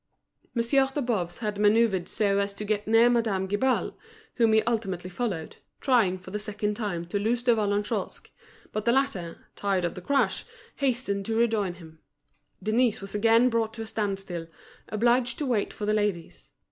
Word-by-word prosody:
Monsieur 255 +3 +3
de 290 - -2
Boves 215 -10 -1
had 210 -1 -2
manoeuvred 210 -3 +3
so 200 -2 +1
as 200 0 -1
to 210 +1 -6
get 210 0 -1
near 225 +2 +6
Madame 225 -6 +1
Guibal, 230 +7 0 0.4
whom 230 -2 +4
he 220 - +4
ultimately 190 -6 -2
followed, 180 -6 -3 0.2
trying 230 -9 +3
for 185 0 -12
the 210 - -3
second 210 0 -2
time 205 -6 -3
to 190 +4 -2
lose 230 +4 0
De 245 -1 +5
Vallagnosc; 205 -1 -1 0.4
but 215 0 -3
the 235 - +4
latter, 220 -11 -1
tired 195 -3 0
of 170 - -2
the 180 - -8
crush, 275 +8 +1 0.3
hastened 240 -7 -1
to 225 - -1
rejoin 215 -6 +1
him. 160 -2 -14 0.6
Denise 225 +1 +2
was 195 0 -7
again 230 +4 +4
brought 225 -1 0
to 225 - -5
a - - -7
standstill, 195 -6 -3 0.4
obliged 240 +2 +2
to 295 - -2
wait 235 -6 0
for 210 - -5
the 210 - +1
ladies. 205 -6 -2
210 Hz, 175 wpm, -27 LUFS, 195-235 Hz, 0.6 s, near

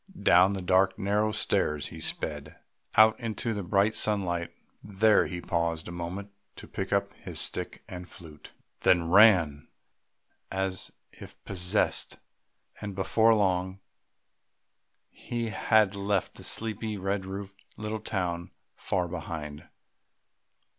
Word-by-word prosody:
Down 95 +1 +6
the 95 -2 -4
dark 95 +1 +3
narrow 105 +1 +1
stairs 75 -7 0
he 80 - -9
sped, 75 -1 -4 0.4
out 110 0 +6
into 115 0 -3
the 105 - -3
bright 100 +4 +2
sunlight; 90 -5 0 0.3
there 105 +1 +3
he 90 -1 -5
paused 85 -2 -1
a - - -6
moment 90 +4 -6 0.2
to - - -11
pick 95 - -5
up 100 0 +1
his - - -7
stick - - -4
and 90 -1 -8
flute, 80 -4 -12 0.3
then 85 -2 +3
ran 90 -8 +5 0.8
as 95 -1 -1 0.2
if - - -12
possessed; 95 +2 0 0.6
and 100 -2 -5
before 110 +4 +3
long 95 -2 0 1.3
he 120 -1 -4
had 105 0 +3
left 100 -1 -1
the - - -10
sleepy 110 -1 -2
red 95 +1 -2
roofed 95 +1 -8
little 105 +1 -4
town 90 -5 -3 0.3
far 90 -2 -1
behind.... 80 -3 -6
95 Hz, 125 wpm, -28 LUFS, 85-105 Hz, 1.3 s, Down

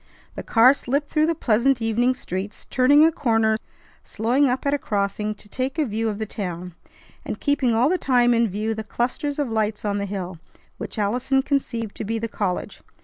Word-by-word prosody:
The - - -6
car 245 +3 +5
slipped 285 +2 -2
through 310 0 +2
the 335 - +1
pleasant 245 -1 +2
evening 240 +3 +1
streets, 190 -3 -6
turning 285 +4 +5
a 325 - +4
corner, 225 -7 +2 0.5
slowing 250 +6 +1
up 255 +3 -2
at 280 - +2
a 290 - +1
crossing 210 0 -2
to 210 - -12
take 260 +7 -3
a 310 - +2
view 225 -1 -1
of 210 - -4
the 220 - -3
town, 180 -4 -5 0.5
and - - -5
keeping 280 -5 +1
all 240 +4 +4
the 365 +3 +1
time 245 -2 +3
in 230 0 +3
view 215 +4 -2
the 220 0 -5
clusters 250 +7 -2
of 285 -6 -1
lights 215 -1 -1
on 205 0 0
the 200 - -2
hill, 185 -3 -5 0.4
which - - -6
Allison 250 +6 +1
conceived 235 -7 -2
to - - -3
be 225 +2 -2
the 225 +1 -3
college. 200 -4 -3
230 Hz, 205 wpm, -23 LUFS, 210-270 Hz, 0.5 s, car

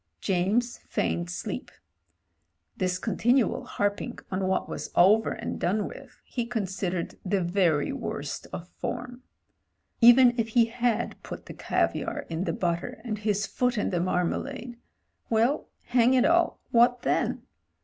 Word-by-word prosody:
James 200 +6 0
feigned 85 +1 -2
sleep: 85 0 -5 1.1
this 185 0 0
continual 230 +5 +1
harping 205 0 -2
on 185 0 -1
what 190 - 0
was - - -5
over 210 +5 +5
and - - -4
done 200 +3 0
with 270 -2 -12
he 240 - -3
considered 190 -6 -3
the 195 +1 +1
very 170 -4 +2
worst 145 0 -5
of 175 - -6
form. 245 +5 -6 0.8
Even 240 +1 +8
if 225 - +1
he 235 - +7
had 235 -1 -1
put - - -8
the - - -8
caviar - - -1
in 165 +3 -2
the - - 0
butter 175 +8 -2
and 215 -4 -3
his 205 -1 0
foot 250 +1 0
in 210 - 0
the 175 - 0
marmalade 230 +8 -2 0.3
— - - -46
well, 230 +6 +1
hang 245 +1 +3
it 255 - +4
all— 345 +1 +3
what 245 +1 +4
then? - - 0
215 Hz, 145 wpm, -27 LUFS, 185-245 Hz, 1.1 s, Even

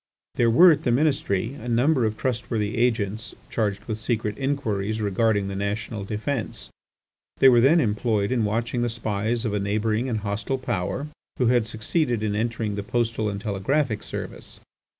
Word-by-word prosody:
There 115 - +3
were 170 +10 +8
at 150 -1 +1
the 130 - -1
Ministry 120 -5 +1
a 125 -3 -7
number 125 +2 +3
of 110 0 -4
trustworthy 110 -4 -2
agents 110 -2 0 0.2
charged 105 -2 -1
with 110 -1 -4
secret 110 -2 -1
inquiries 110 -6 -1
regarding 105 0 +1
the 100 - -4
national 100 +1 -3
defence. 105 - -4 0.7
They 135 - +7
were 120 -2 +5
then 150 +7 +5
employed 105 -3 0
in 120 -3 +1
watching 115 +3 -1
the 120 - +1
spies 115 +1 -2
of 110 - -1
a 105 - 0
neighbouring 110 +4 0
and 110 -3 -1
hostile 105 +5 -2
Power 130 +2 -2 0.3
who 125 -2 +2
had 120 -3 +2
succeeded 115 +2 -1
in 105 -1 0
entering 110 -1 -1
the 100 - -3
Postal 115 0 -1
and 100 -1 -4
Telegraphic 110 +4 0
service. - - -7
110 Hz, 170 wpm, -24 LUFS, 105-120 Hz, 0.7 s, were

